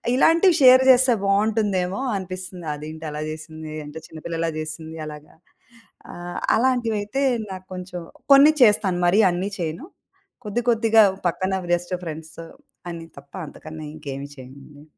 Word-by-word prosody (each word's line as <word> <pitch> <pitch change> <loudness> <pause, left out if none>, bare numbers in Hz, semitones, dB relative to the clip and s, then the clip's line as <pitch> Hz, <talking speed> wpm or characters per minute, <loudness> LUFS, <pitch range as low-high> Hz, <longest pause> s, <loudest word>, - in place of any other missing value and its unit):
ఇలాంటివి 330 +5 +5
షేర్ 255 0 +8
చేస్తే 255 -1 +5
బాగుంటుందేమో 200 -1 +1 0.2
అనిపిస్తుంది 185 -2 -7
అదేంటి 155 +2 -9
అలా 150 0 -5
జేసింది? 155 0 -9
అంటే 155 +2 -8
చిన్నపిల్లలా 165 +1 -4
జేసింది 160 +1 -7
అలాగా. 150 0 -11 0.8
ఆహ్, 175 0 -6 0.2
అలాంటివైతే 235 -1 0 0.3
నాకు 185 0 -8
కొంచెం, 180 -1 -7 0.3
కొన్ని 285 +3 +8
చేస్తాను 205 -5 +4
మరీ 195 +5 +4
అన్నీ 185 +3 -2
చేయను. 165 - -4 0.6
కొద్ది 210 +4 -1
కొద్దిగా 225 -1 +5 0.2
పక్కన 185 +2 -1 0.2
బెస్ట్ 175 +1 0
ఫ్రెండ్స్ 160 -1 -8 0.5
అని 165 -1 -7
తప్ప 140 0 -15
అంతకన్నా 155 +1 -10
ఇంకేమి 140 -2 -7
చేయన్నేను. 140 +3 -13
180 Hz, 125 wpm, -23 LUFS, 155-215 Hz, 0.8 s, షేర్